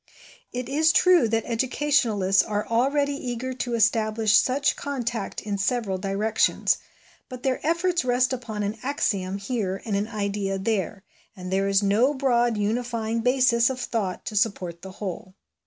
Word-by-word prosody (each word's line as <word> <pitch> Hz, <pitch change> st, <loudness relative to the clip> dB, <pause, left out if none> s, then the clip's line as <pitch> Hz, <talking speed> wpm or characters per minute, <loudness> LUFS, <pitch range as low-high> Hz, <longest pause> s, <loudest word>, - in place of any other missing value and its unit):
It 250 Hz, -1 st, -4 dB
is 310 Hz, +4 st, +3 dB
true 360 Hz, -6 st, +5 dB
that 225 Hz, 0 st, 0 dB
educationalists 230 Hz, -6 st, +2 dB
are 210 Hz, -1 st, -2 dB
already 280 Hz, +5 st, +1 dB
eager 255 Hz, -1 st, -4 dB
to 245 Hz, -1 st, -3 dB
establish 220 Hz, -1 st, +2 dB
such 275 Hz, +4 st, +3 dB
contact 245 Hz, -7 st, -4 dB
in 205 Hz, -2 st, -3 dB
several 200 Hz, -2 st, -1 dB
directions, 205 Hz, +3 st, +1 dB, 0.5 s
but 250 Hz, -1 st, -9 dB
their 260 Hz, -1 st, -1 dB
efforts 340 Hz, +2 st, +1 dB
rest 255 Hz, +1 st, +2 dB
upon 225 Hz, -4 st, -4 dB
an 210 Hz, +2 st, -3 dB
axiom 200 Hz, -8 st, -1 dB
here 200 Hz, -3 st, -3 dB
and 215 Hz, -3 st, -1 dB
an 200 Hz, +2 st, -1 dB
idea 200 Hz, -3 st, -2 dB
there, 195 Hz, -1 st, -2 dB, 0.3 s
and 185 Hz, -1 st, -7 dB
there 195 Hz, +1 st, +1 dB
is 200 Hz, +1 st, +2 dB
no 225 Hz, +9 st, +3 dB
broad 240 Hz, -4 st, +2 dB
unifying 230 Hz, +1 st, -1 dB
basis 250 Hz, -1 st, +3 dB
of 260 Hz, -1 st, -4 dB
thought 205 Hz, -7 st, -3 dB
to 215 Hz, -, -5 dB
support 185 Hz, -5 st, -1 dB
the 190 Hz, 0 st, -9 dB
whole. 185 Hz, -1 st, -7 dB
225 Hz, 155 wpm, -25 LUFS, 200-255 Hz, 0.5 s, true